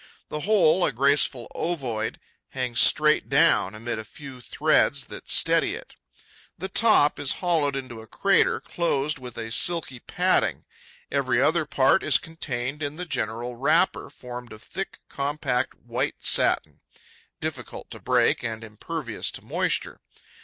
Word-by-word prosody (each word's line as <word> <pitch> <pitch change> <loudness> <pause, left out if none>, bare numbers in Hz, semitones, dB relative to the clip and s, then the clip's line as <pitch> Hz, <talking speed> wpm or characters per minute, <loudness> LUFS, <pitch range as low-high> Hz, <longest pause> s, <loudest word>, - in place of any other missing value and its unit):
The 150 - -4
whole, 185 -1 +3
a 150 - +2
graceful 135 -1 +2
ovoid, 125 -10 -3 0.3
hangs 125 -2 -2
straight 150 0 +4
down, 135 - +3
amid 115 +1 -4
a - - -5
few 130 +3 -11
threads - - +1
that - - -11
steady - - +3
it. - - -11 0.6
The 190 - -5
top 200 -8 +4
is 140 - +3
hollowed 160 -6 0
into 130 -4 -6
a 110 - -14
crater 195 - +2
closed 150 -3 -1
with 125 -2 -9
a 115 -1 -5
silky 155 -1 +1
padding. - - 0 0.5
Every 130 -3 +1
other 155 +4 +2
part 135 +4 +3
is 145 -5 +4
contained 135 -3 -5
in 145 0 -3
the 180 +2 -5
general 120 -4 -3
wrapper, 155 +8 +1
formed 125 -1 -9
of 110 - -13
thick, 195 +2 -6
compact 140 -3 -2
white 120 +4 -3
satin, 75 -3 +1 0.6
difficult - - -6
to - - -8
break - - +2
and 115 -1 -4
impervious 115 +3 -4
to - - -7
moisture. - - -1
135 Hz, 145 wpm, -25 LUFS, 120-155 Hz, 0.6 s, straight